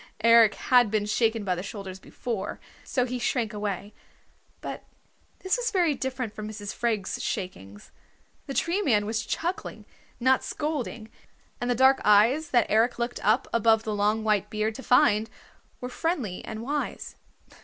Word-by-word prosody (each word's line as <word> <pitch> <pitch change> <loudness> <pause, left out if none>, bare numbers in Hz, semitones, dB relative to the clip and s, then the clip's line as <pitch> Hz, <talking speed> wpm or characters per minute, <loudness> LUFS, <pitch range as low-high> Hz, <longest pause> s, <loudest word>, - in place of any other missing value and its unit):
Eric 230 -2 +6
had 245 -3 +4
been 210 -1 0
shaken 225 +1 +1
by 190 -2 0
the 180 - -4
shoulders 195 -1 -7
before, 220 0 -5 0.2
so 250 -3 0
he 250 0 -4
shrank 235 -3 -1
away. 205 -1 -4 0.7
But - - -6 0.6
this 375 +5 +1
was - - -1
very 350 -6 +2
different 260 -4 -4
from 215 0 -6
Mrs. 205 -2 -6
Freg's 220 -5 -2
shakings. 105 - -6 0.6
The 275 - -5
Tree 350 +5 +1
Man 215 - +2
was 220 +1 -2
chuckling, 345 +10 -4 0.3
not 260 +2 +3
scolding, 260 -7 -4 0.5
and 245 - -1
the 245 - +2
dark 265 +2 +5
eyes 230 +10 +4
that 240 -3 +3
Eric 230 +3 +2
looked 240 0 -3
up 220 +5 +2
above 225 -1 +3
the 215 - -3
long 210 +2 +1
white 210 -2 +1
beard 215 +1 -1
to 265 - -8
find 225 -4 +3 0.5
were 250 - -3
friendly 255 - -3
and 220 +1 -6
wise. 290 +3 -4
225 Hz, 160 wpm, -26 LUFS, 210-255 Hz, 0.7 s, Eric